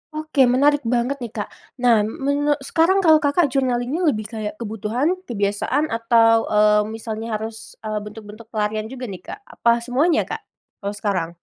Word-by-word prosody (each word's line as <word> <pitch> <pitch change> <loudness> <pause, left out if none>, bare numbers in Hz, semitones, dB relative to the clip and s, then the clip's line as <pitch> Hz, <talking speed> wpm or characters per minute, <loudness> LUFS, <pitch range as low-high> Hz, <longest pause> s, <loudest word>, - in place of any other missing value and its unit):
Oke 310 -4 +2
menarik 285 +4 +3
banget 245 +4 0
nih 240 -3 -6
Kak, 210 - -4 0.3
nah 235 -3 +5
menu 285 +7 0
sekarang 350 +7 +2
kalau 315 -2 +6
Kakak 290 0 +2
journaling-nya 260 +5 0
lebih 215 -7 +1
kayak 215 -2 -4
kebutuhan, 230 - -2
kebiasaan, 215 +8 -1
atau, 230 0 +3
eee, 210 0 +4
misalnya 225 0 -4
harus, 220 +1 -7
eee, 215 -1 -2
bentuk-bentuk 210 +1 -11
pelarian 215 -1 -2
juga 255 +2 -8
nih 195 -6 -6
Kak - - -7
apa 235 - +1
semuanya 295 +7 +2
Kak, - - -5 0.4
kalau 200 0 -4
sekarang? 195 -5 -1
230 Hz, 160 wpm, -21 LUFS, 215-280 Hz, 0.4 s, kalau